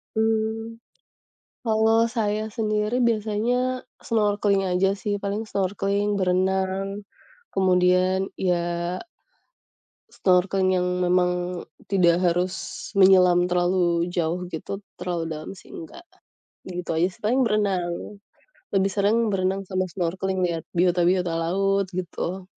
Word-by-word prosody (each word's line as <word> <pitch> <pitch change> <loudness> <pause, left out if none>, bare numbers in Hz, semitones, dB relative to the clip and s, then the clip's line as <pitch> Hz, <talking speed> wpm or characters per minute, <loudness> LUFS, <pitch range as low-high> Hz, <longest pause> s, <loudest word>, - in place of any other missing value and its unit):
Hmm, 225 +1 -1 0.8
kalau 225 0 +3
saya 215 -2 -1
sendiri 215 +2 0
biasanya 235 +3 0 0.2
snorkeling 205 -3 +1
aja 190 +1 +1
sih, 205 0 -3
paling 200 +2 -3
snorkeling, 200 0 -1
berenang, 190 +1 0 0.5
kemudian 185 0 +2
ya 175 -1 -1 1.3
snorkeling 185 +1 +3
yang 180 - 0 0.2
memang 180 0 +3 0.5
tidak 175 -4 +3
harus 180 +1 -1
menyelam 185 -2 +6
terlalu 175 -1 +1
jauh 175 0 -2
gitu, 180 +4 -6 0.2
terlalu 175 -2 -3
dalam 155 -1 -6
sih 195 - -15
enggak, 165 - -10 0.7
gitu 180 -2 -4
aja 165 +3 +2
sih. 180 - -14
Paling 245 +5 +2
berenang, 195 -2 -1 0.6
lebih 195 0 +2
sering 210 +3 +2
berenang 190 0 0
sama 185 -1 -2
snorkeling 185 +1 -2
liat 170 -3 -2
biota-biota 180 0 +2
laut 195 +3 +1
gitu, 185 +1 -4
190 Hz, 105 wpm, -24 LUFS, 180-210 Hz, 1.3 s, menyelam